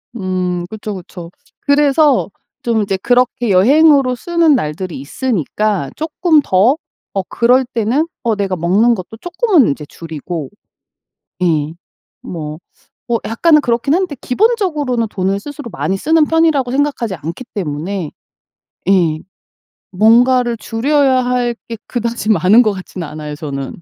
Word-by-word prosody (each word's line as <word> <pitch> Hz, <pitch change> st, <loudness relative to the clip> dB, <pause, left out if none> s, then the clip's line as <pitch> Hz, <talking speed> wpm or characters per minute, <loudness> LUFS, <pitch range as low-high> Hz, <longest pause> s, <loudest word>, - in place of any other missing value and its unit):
음. 185 Hz, -3 st, -2 dB
그쵸, 215 Hz, -1 st, -6 dB
그쵸. 175 Hz, -2 st, -10 dB, 0.3 s
그래서 285 Hz, -2 st, +3 dB, 0.3 s
좀 230 Hz, -2 st, 0 dB
이제 195 Hz, -1 st, -1 dB
그렇게 245 Hz, +2 st, +1 dB
여행으로 270 Hz, +6 st, +4 dB
쓰는 335 Hz, +2 st, +2 dB
날들이 165 Hz, -, -4 dB
있으니까 205 Hz, -, -2 dB
쪼끔 315 Hz, 0 st, +2 dB
더 215 Hz, +10 st, +3 dB, 0.4 s
어 195 Hz, -, +1 dB
그럴 250 Hz, +3 st, +3 dB
때는 245 Hz, +5 st, -1 dB, 0.2 s
어 230 Hz, -3 st, +1 dB
내가 195 Hz, -2 st, -1 dB
먹는 195 Hz, +8 st, +2 dB
것도 195 Hz, +3 st, -9 dB
쪼끔은 350 Hz, -, +2 dB
인제 150 Hz, +1 st, -3 dB
줄이고 160 Hz, -1 st, -7 dB, 0.9 s
예. 155 Hz, -3 st, +1 dB, 0.5 s
뭐 155 Hz, -3 st, -6 dB, 0.5 s
어 235 Hz, -1 st, +1 dB
약간은 300 Hz, +7 st, +3 dB
그렇긴 240 Hz, +2 st, 0 dB
한데 355 Hz, -3 st, 0 dB
기본적으로는 300 Hz, -, 0 dB
돈을 195 Hz, 0 st, -1 dB
스스로 290 Hz, -2 st, -8 dB
많이 190 Hz, 0 st, -2 dB
쓰는 315 Hz, +8 st, +3 dB
편이라고 315 Hz, -6 st, +2 dB
생각하지 270 Hz, -6 st, -1 dB
않기 165 Hz, -, -7 dB
때문에 170 Hz, -1 st, -3 dB, 0.8 s
예. 170 Hz, -5 st, +3 dB, 0.7 s
뭔가를 240 Hz, +4 st, +3 dB
줄여야 260 Hz, +4 st, +1 dB
할 245 Hz, -1 st, 0 dB
게 230 Hz, -, -5 dB
그다지 235 Hz, -2 st, -3 dB
많은 205 Hz, +5 st, +5 dB
것 215 Hz, -3 st, +1 dB
같지는 185 Hz, -3 st, -7 dB
않아요, 150 Hz, 0 st, -7 dB
저는. 140 Hz, 0 st, -6 dB
230 Hz, 280 characters per minute, -16 LUFS, 185-275 Hz, 0.9 s, 많은